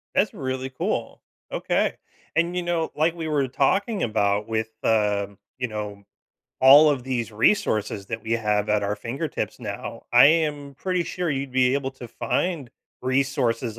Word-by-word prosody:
That's 200 Hz, -, +2 dB
really 130 Hz, -1 st, -3 dB
cool. 130 Hz, -, -3 dB, 0.3 s
Okay, -, -, 0 dB, 0.4 s
and, 170 Hz, +2 st, +1 dB
you 180 Hz, -, 0 dB
know, 170 Hz, -2 st, -1 dB
like 160 Hz, +2 st, +2 dB
we 165 Hz, -2 st, -4 dB
were 145 Hz, -3 st, +1 dB
talking 195 Hz, -, +1 dB
about 105 Hz, -2 st, +1 dB
with, 110 Hz, 0 st, -1 dB
um, 105 Hz, -2 st, +1 dB, 0.2 s
you 125 Hz, -1 st, -2 dB
know, 105 Hz, -2 st, -6 dB, 0.6 s
all 145 Hz, +4 st, +8 dB
of 140 Hz, -4 st, -1 dB
these 120 Hz, -4 st, -2 dB
resources 105 Hz, -, +1 dB
that 115 Hz, 0 st, -5 dB
we 110 Hz, -, -3 dB
have 105 Hz, -2 st, +1 dB
at 105 Hz, -1 st, +2 dB
our 100 Hz, +1 st, -1 dB
fingertips 135 Hz, +8 st, -4 dB
now, 115 Hz, 0 st, -6 dB
I 125 Hz, +3 st, +9 dB
am 145 Hz, -3 st, +1 dB
pretty 180 Hz, +3 st, -1 dB
sure 180 Hz, -1 st, -2 dB
you'd 135 Hz, -1 st, -3 dB
be 130 Hz, 0 st, +3 dB
able 140 Hz, -1 st, -1 dB
to 125 Hz, -2 st, -10 dB
find 150 Hz, +2 st, -2 dB, 0.3 s
resources 130 Hz, -3 st, 0 dB
130 Hz, 160 wpm, -24 LUFS, 110-150 Hz, 0.6 s, I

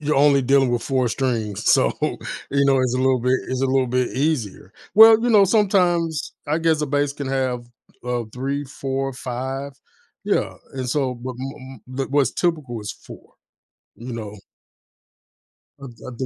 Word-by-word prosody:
you're 150 Hz, -1 st, 0 dB
only 140 Hz, -1 st, +5 dB
dealing 135 Hz, 0 st, +3 dB
with 120 Hz, -1 st, -1 dB
4 130 Hz, -3 st, 0 dB
strings, 115 Hz, -6 st, -2 dB
so, -, -, +4 dB
you 140 Hz, 0 st, -2 dB
know, 135 Hz, -1 st, +4 dB
it's 125 Hz, -1 st, 0 dB
a -, -, 0 dB
little 130 Hz, -1 st, +2 dB
bit 125 Hz, +1 st, +2 dB
it's 130 Hz, +1 st, -2 dB
a -, -, +3 dB
little 130 Hz, 0 st, +2 dB
bit 125 Hz, 0 st, 0 dB
easier. 125 Hz, -9 st, -2 dB, 0.2 s
Well, 220 Hz, +1 st, +9 dB
you 245 Hz, -, +1 dB
know, 205 Hz, -3 st, +6 dB
sometimes 180 Hz, -6 st, +1 dB
I 155 Hz, +3 st, 0 dB
guess 160 Hz, -2 st, +1 dB
a -, -, 0 dB
bass 145 Hz, 0 st, 0 dB
can 140 Hz, -2 st, -6 dB
have, 130 Hz, -2 st, -1 dB, 0.4 s
uh, 120 Hz, -1 st, -2 dB
3, 140 Hz, +3 st, -3 dB
4, 135 Hz, 0 st, -3 dB
5. 130 Hz, +2 st, -5 dB, 0.5 s
Yeah -, -, 0 dB, 0.2 s
and, 130 Hz, -2 st, -4 dB
so 130 Hz, -1 st, 0 dB
but 125 Hz, +2 st, -6 dB
m 130 Hz, -2 st, -8 dB, 0.2 s
m 135 Hz, -, -1 dB
What's 140 Hz, -1 st, +2 dB
typical 150 Hz, -10 st, -2 dB
is 105 Hz, -1 st, -5 dB
4, -, -, -15 dB, 0.6 s
you 120 Hz, +2 st, -8 dB
know? 105 Hz, -3 st, -6 dB, 1.5 s
I -, -, -6 dB
d -, -, -23 dB
I -, -, -4 dB
do 130 Hz, -, -2 dB
135 Hz, 175 wpm, -22 LUFS, 125-145 Hz, 1.5 s, Well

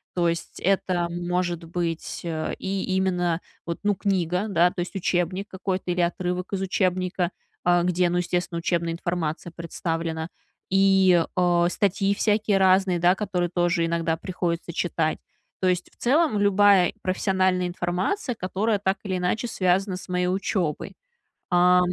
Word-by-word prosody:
То 175 Hz, -1 st, +2 dB
есть 170 Hz, 0 st, -3 dB
это 185 Hz, -2 st, +1 dB
может 175 Hz, 0 st, -2 dB
быть, 170 Hz, -1 st, -3 dB
э, 160 Hz, -2 st, -3 dB
и 195 Hz, 0 st, -2 dB
именно 180 Hz, -3 st, +1 dB, 0.3 s
вот, 170 Hz, -1 st, -4 dB
ну, 205 Hz, 0 st, +3 dB
книга, 185 Hz, 0 st, 0 dB
да, 175 Hz, -2 st, +4 dB
то -, -, -8 dB
есть 180 Hz, +3 st, -6 dB
учебник 185 Hz, +2 st, -1 dB
какой-то 190 Hz, -1 st, -3 dB
или 175 Hz, 0 st, 0 dB
отрывок 180 Hz, +1 st, -2 dB
из 195 Hz, -, -1 dB
учебника, 185 Hz, -1 st, 0 dB, 0.4 s
э, 175 Hz, 0 st, +4 dB
где, 180 Hz, 0 st, +2 dB
ну, 175 Hz, -, 0 dB
естественно, 180 Hz, -1 st, -1 dB
учебная 170 Hz, 0 st, 0 dB
информация 170 Hz, -1 st, -3 dB
представлена, 165 Hz, -1 st, -3 dB, 0.4 s
и, 190 Hz, -2 st, +5 dB
э, 175 Hz, -1 st, +3 dB
статьи 195 Hz, +1 st, +1 dB
всякие 210 Hz, -1 st, +2 dB
разные, 190 Hz, -1 st, +3 dB
да, 175 Hz, +1 st, +5 dB
которые 185 Hz, -4 st, -1 dB
тоже 175 Hz, -1 st, +1 dB
иногда 165 Hz, -1 st, 0 dB
приходится 170 Hz, -1 st, -3 dB
читать. 160 Hz, -2 st, -1 dB, 0.4 s
То 185 Hz, -, +2 dB
есть 180 Hz, -1 st, -1 dB
в -, -, -29 dB
целом, 285 Hz, -2 st, +2 dB
любая 200 Hz, -2 st, +5 dB
профессиональная 185 Hz, -1 st, +1 dB
информация, 180 Hz, -, -2 dB
которая 205 Hz, +3 st, -1 dB
так 195 Hz, 0 st, 0 dB
или 190 Hz, -3 st, -2 dB
иначе 180 Hz, +6 st, -1 dB
связана 190 Hz, -2 st, +1 dB
с 185 Hz, -, -10 dB
моей 180 Hz, 0 st, 0 dB
учебой. 185 Hz, -3 st, -2 dB, 0.6 s
Э, 180 Hz, +1 st, +6 dB
180 Hz, 150 wpm, -25 LUFS, 175-190 Hz, 0.6 s, Э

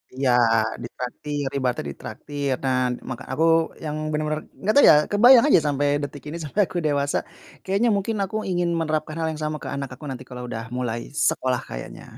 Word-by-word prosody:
Iya, 130 Hz, -1 st, +2 dB, 0.5 s
ditraktir, 140 Hz, +4 st, -5 dB
ibaratnya 125 Hz, -2 st, -1 dB
ditraktir. 140 Hz, -, -4 dB
Nah 130 Hz, -1 st, +2 dB, 0.3 s
ma -, -, -1 dB, 0.2 s
aku 160 Hz, -, +1 dB, 0.4 s
yang 150 Hz, 0 st, -3 dB, 0.2 s
benar-benar 155 Hz, 0 st, -1 dB, 0.2 s
enggak 210 Hz, +3 st, +1 dB
tahu 285 Hz, -, +8 dB
ya -, -, +8 dB, 0.2 s
kebayang 240 Hz, +4 st, +7 dB
aja 285 Hz, -, +6 dB
sampai 145 Hz, 0 st, +1 dB, 0.2 s
detik 145 Hz, -1 st, -6 dB
ini 170 Hz, -, -5 dB
sampai 155 Hz, +8 st, 0 dB
aku 185 Hz, -, -6 dB
dewasa, 145 Hz, -1 st, +1 dB, 0.5 s
kayaknya 200 Hz, +5 st, +1 dB
mungkin 205 Hz, +3 st, -1 dB
aku 195 Hz, -, -5 dB
ingin 175 Hz, -1 st, 0 dB
menerapkan 155 Hz, -1 st, -2 dB
hal 160 Hz, -, 0 dB
yang 155 Hz, -, -7 dB
sama 155 Hz, 0 st, -2 dB
ke -, -, -5 dB
anak 140 Hz, -1 st, -4 dB
aku 140 Hz, -, -13 dB
nanti 130 Hz, -1 st, -6 dB
kalau 125 Hz, 0 st, -7 dB
udah 115 Hz, -1 st, -5 dB
mulai 120 Hz, -2 st, -2 dB, 0.3 s
sekolah 125 Hz, -1 st, 0 dB
kayaknya, -, -, -8 dB
150 Hz, 180 wpm, -24 LUFS, 130-170 Hz, 0.5 s, tahu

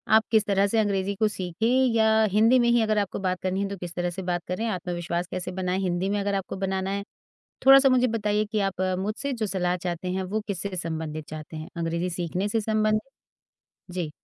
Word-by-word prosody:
आप 220 Hz, -, +6 dB
किस 220 Hz, -2 st, +4 dB
तरह 200 Hz, 0 st, +2 dB
से 225 Hz, -, 0 dB
अंग्रेज़ी 200 Hz, -2 st, 0 dB
को 215 Hz, +2 st, +2 dB
सीखें 185 Hz, 0 st, -2 dB, 0.3 s
या 220 Hz, -1 st, +4 dB
हिंदी 225 Hz, +5 st, +5 dB
में 240 Hz, -1 st, +3 dB
ही 235 Hz, 0 st, +4 dB
अगर 215 Hz, -1 st, +1 dB
आपको 200 Hz, -2 st, -1 dB
बात 185 Hz, -2 st, -1 dB
करनी 185 Hz, +1 st, -1 dB
है 200 Hz, -, -2 dB
तो 200 Hz, -, -5 dB
किस 175 Hz, -1 st, -7 dB
तरह 175 Hz, 0 st, -1 dB
से 175 Hz, +2 st, -6 dB
बात 175 Hz, -1 st, -1 dB
करें? 185 Hz, +6 st, -2 dB
आत्मविश्वास 175 Hz, -3 st, -3 dB
कैसे 180 Hz, 0 st, -4 dB
बनाएँ 185 Hz, 0 st, -1 dB
हिंदी 185 Hz, 0 st, -1 dB
में 205 Hz, 0 st, 0 dB
अगर 200 Hz, 0 st, -1 dB
आपको 195 Hz, -1 st, -3 dB
बनाना 190 Hz, 0 st, -1 dB
है? 200 Hz, 0 st, -2 dB, 0.6 s
थोड़ा-सा 270 Hz, 0 st, +9 dB
मुझे 255 Hz, -1 st, +4 dB
बताइए 210 Hz, -2 st, 0 dB
कि 215 Hz, -, +1 dB
आप 195 Hz, -2 st, -1 dB, 0.2 s
मुझसे 215 Hz, +8 st, -2 dB
जो 230 Hz, -4 st, -2 dB
सलाह 180 Hz, -2 st, 0 dB
चाहते 175 Hz, 0 st, -4 dB
हैं, 190 Hz, +1 st, -1 dB
वो 200 Hz, +4 st, -2 dB
किस 195 Hz, -5 st, -3 dB
से 200 Hz, -2 st, -4 dB
संबंधित 160 Hz, -2 st, -4 dB
चाहते 155 Hz, +1 st, -8 dB
हैं, 155 Hz, 0 st, -7 dB
अंग्रेज़ी 170 Hz, +1 st, -1 dB
सीखने 180 Hz, +3 st, -2 dB
से 225 Hz, +2 st, 0 dB
संबंध 215 Hz, 0 st, +1 dB, 0.9 s
जी। 175 Hz, -3 st, -3 dB
195 Hz, 220 wpm, -26 LUFS, 180-215 Hz, 0.9 s, थोड़ा-सा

